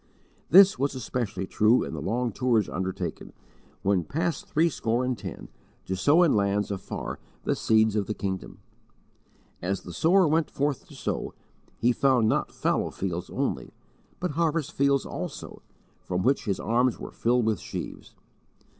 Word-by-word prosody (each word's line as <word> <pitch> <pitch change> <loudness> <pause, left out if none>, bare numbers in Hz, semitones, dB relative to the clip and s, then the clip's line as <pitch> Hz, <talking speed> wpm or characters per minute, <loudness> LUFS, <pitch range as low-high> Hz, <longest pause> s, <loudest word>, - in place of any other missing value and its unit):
This 190 -3 +7
was 140 0 0
especially 110 -6 -3
true 110 +5 +3
in - - -6
the 75 - -4
long 120 - -1
tours 115 -3 +1
undertaken, 95 +1 -4 0.5
when 95 -3 +2
past 165 - -2
threescore 130 -7 +1
and 130 0 0
ten, 100 -5 -8 0.4
to 95 - -2
sow 145 - +4
in 165 - +4
lands 100 0 +1
afar 95 -2 -5 0.2
the - - +1
seeds 110 -1 +3
of 105 -2 0
the 105 - -2
Kingdom! 95 -2 -4 1.0
As 95 +2 -2
the 90 - -8
sower 175 - +4
went 155 +1 +2
forth 145 -1 -2
to - - -14
sow - - -3 0.4
he 120 - +3
found 125 -3 +3
not - - +1
fallow - - 0
fields 90 -2 -4
only, - - -3 0.4
but 180 -2 -2
harvest 165 -1 0
fields 140 -2 +2
also, - - -6 0.4
from 90 0 -2
which 135 +3 +2
his 100 -4 -1
arms 120 +4 +1
were - - -7
filled 120 0 +1
with 110 -2 +1
sheaves. - - -7
120 Hz, 155 wpm, -27 LUFS, 100-140 Hz, 1.0 s, This